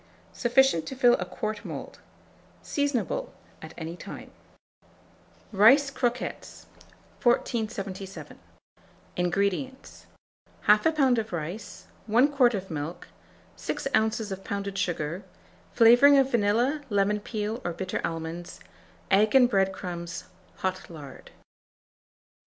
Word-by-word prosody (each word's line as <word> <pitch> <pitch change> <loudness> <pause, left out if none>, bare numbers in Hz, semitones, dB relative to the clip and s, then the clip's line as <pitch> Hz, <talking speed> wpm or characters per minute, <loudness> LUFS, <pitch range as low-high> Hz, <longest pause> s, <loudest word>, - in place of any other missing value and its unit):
Sufficient 245 -8 +3
to 265 - -5
fill 245 -2 +5
a 180 - -2
quart 215 +3 -5
mould. - - -8 0.6
Seasonable 285 - -1 0.3
at - - -10
any 165 0 -6
time. - - -10 1.2
RICE 255 +8 +6
CROQUETTES. 245 -2 -3 0.6
1477. 210 -5 -2 0.8
INGREDIENTS. 200 +9 -2 0.6
1/2 215 +10 +4
lb. 265 -5 +3
of 220 0 -5
rice, 175 +5 -6 0.2
1 240 +6 +4
quart 250 -5 +4
of 190 -2 -6
milk, 155 +2 -5 0.5
6 - - -4
oz. 220 -1 +1
of 190 0 -6
pounded 200 -1 -4
sugar, 175 0 -2 0.5
flavouring 245 +5 +7
of 270 0 +3
vanilla, 235 +7 +2
lemon 205 0 +1
peel, 215 +2 -4
or 175 - -2
bitter 185 +2 -4
almonds, 165 +2 -5 0.5
egg 210 +5 +4
and 250 -2 +6
bread 195 -2 +2
crumbs, 175 -2 -6 0.4
hot 185 0 -2
lard. 145 -5 -11
210 Hz, 110 wpm, -27 LUFS, 185-245 Hz, 1.2 s, flavouring